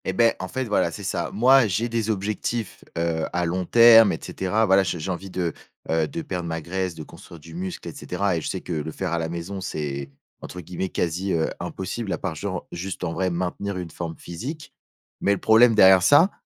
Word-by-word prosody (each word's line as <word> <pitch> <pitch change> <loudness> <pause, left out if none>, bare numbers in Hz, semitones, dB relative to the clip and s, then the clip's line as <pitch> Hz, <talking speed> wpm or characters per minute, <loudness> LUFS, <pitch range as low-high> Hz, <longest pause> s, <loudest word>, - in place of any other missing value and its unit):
Et 95 - -1
beh, 115 +3 +3
en 95 - -4
fait 130 +6 -3
voilà, 105 - +1
c'est - - -8
ça. - - -2
Moi, 125 +3 +5
j'ai 110 +5 0
des 115 -2 -2
objectifs, 105 +1 -3
heu, 85 -1 0
à 90 0 0
long 90 +2 -1
terme 115 0 +8
et - - -3
cetera, 105 +4 0
voilà, 95 -1 +5
je 90 -2 -2
j'ai 85 +4 -4
envie 95 +2 -5
de, 90 -3 -2 0.4
heu, 80 -1 +2
de 165 - -5
perdre 90 - -4
ma 80 0 -3
graisse, 90 +2 -3
de 80 - -7
construire 85 +2 -13
du 80 +2 -13
muscle 90 +2 -5
et - - -6
cetera, 100 -3 -2
et 80 - -2
je - - -5
sais - - -3
que 90 - -5
le 80 0 -3
faire 90 +2 -4
à 85 - 0
la 80 0 -2
maison 85 +4 -5
c'est, 70 -6 -4 0.3
entre 90 - -8
guillemets, 90 +3 -4
«quasi, 90 +3 -1
heu, 80 -1 +1
impossible» 95 +2 -4
à - - -2
part 95 - -3
genre, 95 +3 -5
juste, 95 +2 -5
en 85 -2 -2
vrai, 95 +1 0
maintenir 90 +3 -3
une 90 -3 -6
forme 80 +1 -5
physique. 140 - -7 0.5
Mais 100 - +3
le - - -1
problème 115 +1 +5
derrière 95 -2 +7
ça, 145 - +6
95 Hz, 230 wpm, -24 LUFS, 85-105 Hz, 0.5 s, terme